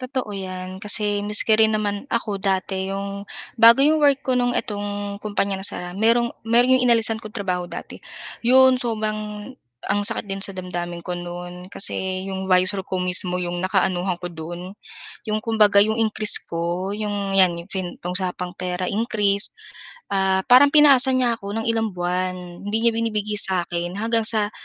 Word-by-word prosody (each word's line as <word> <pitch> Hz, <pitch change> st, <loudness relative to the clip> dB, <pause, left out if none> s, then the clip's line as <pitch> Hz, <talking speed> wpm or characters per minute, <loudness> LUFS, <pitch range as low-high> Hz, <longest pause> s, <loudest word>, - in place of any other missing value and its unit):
Totoo 255 Hz, -4 st, -4 dB
'yan, 185 Hz, 0 st, -7 dB
kasi 205 Hz, -1 st, 0 dB
maski 210 Hz, +1 st, +3 dB
rin 220 Hz, 0 st, +4 dB
naman 205 Hz, -1 st, -2 dB
ako 210 Hz, -4 st, -2 dB
dati 190 Hz, 0 st, -1 dB
'yong 200 Hz, 0 st, -5 dB, 0.3 s
bago 230 Hz, +1 st, +7 dB
'yong 300 Hz, +2 st, +3 dB
work 280 Hz, -1 st, +3 dB
ko 260 Hz, -, +1 dB
no'ng 245 Hz, -1 st, +1 dB
itong 205 Hz, -1 st, -5 dB
kumpanya 200 Hz, -2 st, -2 dB
nasara, 180 Hz, -2 st, -3 dB
mayro'n 230 Hz, +3 st, +2 dB
mayro'n 245 Hz, +3 st, +4 dB
'yong -, -, +2 dB
inalisan 225 Hz, -1 st, +2 dB
kong 215 Hz, -, -8 dB
trabaho 180 Hz, -5 st, -3 dB
dati, -, -, -9 dB, 0.4 s
'yon 260 Hz, +2 st, +6 dB
sobrang 215 Hz, -2 st, -4 dB, 0.3 s
ang 205 Hz, -, 0 dB
sakit 205 Hz, -, 0 dB
din 195 Hz, -1 st, -5 dB
sa 195 Hz, -1 st, 0 dB
damdamin 175 Hz, -2 st, -5 dB
ko 180 Hz, -, -4 dB
no'n 175 Hz, +1 st, -7 dB
kasi 190 Hz, -1 st, -3 dB
'yong 190 Hz, 0 st, -5 dB
visor 185 Hz, +2 st, +3 dB
ko 185 Hz, -, -2 dB
mismo 180 Hz, 0 st, 0 dB
'yong 175 Hz, -1 st, -3 dB
nakaanuhan 185 Hz, -1 st, 0 dB
ko 180 Hz, -, -7 dB
do'n. 175 Hz, +3 st, -8 dB, 0.6 s
'Yong 215 Hz, 0 st, -2 dB
kumbaga 215 Hz, -3 st, +3 dB
'yong 220 Hz, +3 st, +3 dB
increase 215 Hz, -1 st, +2 dB
ko 170 Hz, +3 st, -3 dB
'yong, 205 Hz, -2 st, -3 dB
'yan 185 Hz, -2 st, +5 dB
yung 175 Hz, -, -19 dB
fin 185 Hz, -3 st, -4 dB, 0.2 s
usapang 180 Hz, 0 st, -4 dB
pera 180 Hz, 0 st, -3 dB
increase, 205 Hz, -2 st, +1 dB, 0.6 s
ah, 190 Hz, -1 st, +1 dB
parang 280 Hz, +4 st, +7 dB
pinaasa 275 Hz, -3 st, +7 dB
niya 245 Hz, -3 st, +1 dB
ako 200 Hz, -1 st, -7 dB
ng 225 Hz, 0 st, -2 dB
ilang 225 Hz, -3 st, -1 dB
buwan, 180 Hz, +1 st, -2 dB, 0.3 s
hindi 220 Hz, +2 st, -1 dB
niya 235 Hz, -, +4 dB
binibigay 215 Hz, -2 st, -2 dB
sa 190 Hz, -3 st, +4 dB
akin 175 Hz, +1 st, -4 dB
hanggang 225 Hz, +2 st, 0 dB
sa 215 Hz, -2 st, +1 dB
205 Hz, 170 wpm, -22 LUFS, 185-225 Hz, 0.6 s, bago